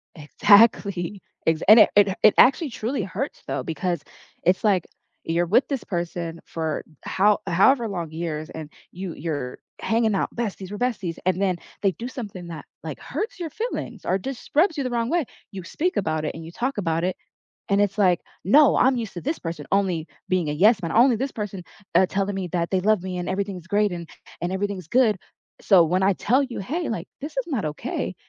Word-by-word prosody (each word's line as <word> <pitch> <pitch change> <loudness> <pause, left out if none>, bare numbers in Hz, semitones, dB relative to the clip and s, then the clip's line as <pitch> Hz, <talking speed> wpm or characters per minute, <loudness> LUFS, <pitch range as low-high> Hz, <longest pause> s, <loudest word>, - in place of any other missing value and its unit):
Exactly, 200 +2 +3 0.2
ex 160 0 +2
and 220 +2 +10
it - - +6
it 205 -1 +6
it 215 - +7
actually 275 +4 +5
truly 230 +1 -2
hurts 205 +9 -5
though 130 - -2
because 165 +2 -2 0.4
it's 185 +5 +2
like 195 -5 +3 0.4
you're 170 +2 0
with 230 +10 +3
this 275 -4 -3
person 170 -2 -4
for 160 -2 -3 0.2
how 205 +2 +3
however 225 +7 +4
long 175 -5 -4
years 155 -1 -4
and 155 -2 -8 0.2
you 185 -1 -6
you're 145 -5 -4 0.2
hanging 225 -2 +1
out; - - -1
"Besties 200 -4 -4
we're 205 - -5
besties," 210 -9 -2
and 185 0 +1
then 185 -3 +1 0.2
they 195 - +3
do 235 - -6
something 205 -9 -7
that, 165 -2 -8 0.2
like, - - -6
hurts 455 -1 -5
your 330 -2 -3
feelings 470 +3 -4
or 190 - +1
just 260 +5 -7
rubs 320 0 +4
you 280 - 0
the 255 - -2
wrong 235 0 -1
way. 340 -3 +1 0.3
You 190 -2 -7
speak 345 - -2
about 160 -5 -1
it - - -2
and 165 - -8
you 165 - -9
talk 255 +5 -2
about 165 -2 0
it 185 0 0 0.5
and 200 0 +3
it's 205 0 0
like, 180 -4 +3 0.2
"No, 280 - +6
I'm 260 0 +4
used 225 -3 -4
to 175 - -6
this 305 +4 -2
person 165 -3 -5
only 185 -5 +1 0.2
being 180 -5 +1
a - - -1
yes 200 +6 +4
man, 165 - -2
only; 240 +4 +5
this 265 +4 -2
person, 205 -4 -5 0.3
uh, 190 - +6
telling 195 +1 -2
me 190 -2 -3
that 170 0 -1
they 190 - +1
love 215 -2 +3
me 185 -1 -4
and 175 - -4
everything's 190 -2 -3
great 205 +1 +2
and 170 -1 -6
a - - -15
and 175 - -1
everything's 190 -3 -3
good." 230 -4 +3 0.4
So 185 -5 +6
when 180 +4 +1
I 195 +1 +4
tell 250 +8 +2
you, 255 -5 -5
"Hey," 310 - -3
like, 185 -5 -4
"this 300 +2 -6
is - - 0
not 250 - -2
okay," 150 -1 -3
195 Hz, 210 wpm, -24 LUFS, 170-230 Hz, 0.5 s, and